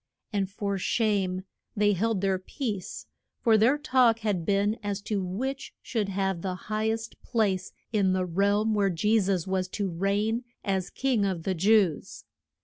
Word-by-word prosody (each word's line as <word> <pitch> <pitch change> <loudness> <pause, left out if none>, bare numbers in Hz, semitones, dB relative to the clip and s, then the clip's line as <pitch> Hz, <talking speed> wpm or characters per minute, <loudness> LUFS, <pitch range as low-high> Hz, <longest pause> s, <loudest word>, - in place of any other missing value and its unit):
And 195 -2 0
for 200 0 -3
shame 195 -3 0 0.3
they 205 0 +4
held 210 +1 0
their 190 -1 +1
peace, 205 -1 -5 0.3
for 225 -3 +4
their 230 +7 +4
talk 255 -6 +3
had 200 -6 -1
been 205 +3 +1
as 205 -1 -2
to 205 -3 -1
which 260 +10 -4
should 215 -5 -2
have 195 -2 -1
the 185 0 -2
high 215 +3 -2
est 225 +1 -4
place 200 -6 0 0.2
in 200 -3 +3
the 185 0 +1
realm 200 +5 +2
where 200 -2 +2
Je 210 +6 +2
sus 190 -4 0
was 190 -1 -1
to 195 0 -3
reign 205 +7 0 0.2
as 190 -2 0
King 255 -6 0
of 185 -4 -1
the 190 - 0
Jews. 190 -2 +2
200 Hz, 165 wpm, -27 LUFS, 190-220 Hz, 0.3 s, they